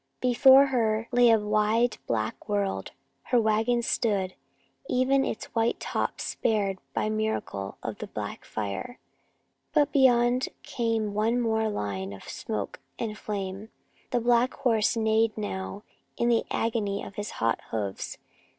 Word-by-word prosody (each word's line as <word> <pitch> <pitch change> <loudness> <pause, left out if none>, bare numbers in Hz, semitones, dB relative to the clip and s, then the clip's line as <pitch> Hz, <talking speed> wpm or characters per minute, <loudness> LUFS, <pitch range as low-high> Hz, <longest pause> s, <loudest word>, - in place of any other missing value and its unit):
Before 265 +2 +7
her 225 -4 0
lay 245 -1 +5
a 225 - +6
wide 215 +2 +1
black 110 - -2
world. 200 - -1 0.3
Her 245 - +3
wagon 225 +2 +2
stood, 200 -6 0 0.6
even 265 +2 +3
its - - -3
white 230 +1 +1
top - - -2
spared 200 -4 0 0.2
by - - +1
miracle 215 - -2
of - - -5
the - - -5
back - - -6
fire. 110 - -4 0.8
But 295 -2 +3
beyond 250 -2 +4
came 225 -3 -1
one 225 +4 +1
more 220 -2 +1
line 100 - -3
of 95 - -11
smoke 105 -2 -4 0.2
and 220 -2 -3
flame. 200 0 -5 0.4
The 245 - +1
black 240 +1 +3
horse 225 -2 +2
neighed 220 0 +2
now 200 -1 -4 0.3
in 235 - +2
the 230 -1 +3
agony 215 -3 -1
of - - -8
his 205 +1 -4
hot 115 0 +1
hoofs. 100 -3 -3
220 Hz, 140 wpm, -27 LUFS, 200-240 Hz, 0.8 s, Before